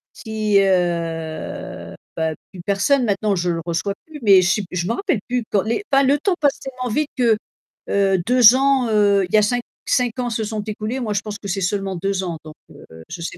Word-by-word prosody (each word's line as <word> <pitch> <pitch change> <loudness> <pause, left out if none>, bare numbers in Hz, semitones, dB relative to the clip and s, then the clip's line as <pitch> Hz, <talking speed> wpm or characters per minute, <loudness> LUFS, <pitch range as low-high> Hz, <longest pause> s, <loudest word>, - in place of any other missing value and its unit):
S - - -12
si, 215 -2 +1
heu, 170 -4 -2 0.2
bah, 160 -1 -1 0.2
plus 185 - -10
personne, 245 +7 +2
maintenant, 205 -1 0
je 175 -1 -1
le 165 -1 -2
reçois 170 +4 -1
plus, 315 -2 -11
mais 200 -4 +6
che 190 +4 +1
je 175 -1 -2
me 230 - 0
rappelle 360 - -1
plus 250 -1 -1
quand 200 - +3
les 230 - -2
enfin 275 0 +5
le 275 +2 +3
temps 360 +5 0
passe 285 -2 +1
tellement 255 -2 -5
vite 300 +3 0
que 235 -4 +3 0.5
heu, 195 -1 +2
2 245 -1 +7
ans 270 -2 +2
heu, 205 -2 +3
il - - -15
y - - +7
a - - +6
5 245 +4 +1 0.2
5 250 -1 0
ans 245 -1 -1
se 225 -1 -2
sont 215 0 -3
écoulés, 215 +4 -4
moi 225 -4 -2
je 200 - 0
pense 210 -1 -6
que 200 - -8
c'est 195 +1 -2
seulement 195 +1 -1
2 195 +2 -2
ans, 170 -3 -4
donc, 155 -1 -11 0.2
heu, - - -14 0.2
je 170 - -7
sais 170 - -5
210 Hz, 230 wpm, -20 LUFS, 190-250 Hz, 0.5 s, 2